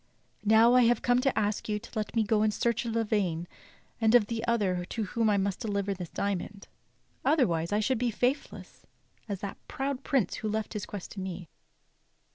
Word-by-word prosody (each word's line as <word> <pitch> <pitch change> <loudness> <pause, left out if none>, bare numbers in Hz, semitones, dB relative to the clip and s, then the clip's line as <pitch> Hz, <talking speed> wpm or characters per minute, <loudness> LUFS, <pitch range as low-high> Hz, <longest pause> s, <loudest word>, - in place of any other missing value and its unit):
Now 220 +3 +6
I 250 - +6
have 235 -1 +2
come 245 +1 +3
to 270 0 +1
ask 210 0 -1
you 210 - +1
to 210 - -11
let 215 +1 -3
me 225 - +3
go 215 0 +2
in 215 - +3
search 235 +2 0
of 230 - -2
Lavaine 200 -7 0 0.5
and 225 +1 +5
of 235 -4 +6
that 230 +1 -3
other 190 -6 +1
to 220 +5 -4
whom 225 +2 0
I 205 - +3
must 195 -1 -1
deliver 200 -3 -1
this 180 -3 -7
diamond, 200 0 -3 0.6
otherwise 205 - +2
I 210 +1 +2
should 255 +2 +1
be 245 0 +1
faithless 250 +5 -3 0.4
as 200 -2 -3
that 200 - -5
proud 275 -2 -3
prince 265 -8 +1
who 215 - -3
left 215 0 -2
his 210 -2 -4
quest 200 -3 -7
to 200 - -7
me. 185 -3 -6
215 Hz, 200 wpm, -29 LUFS, 200-235 Hz, 0.6 s, Now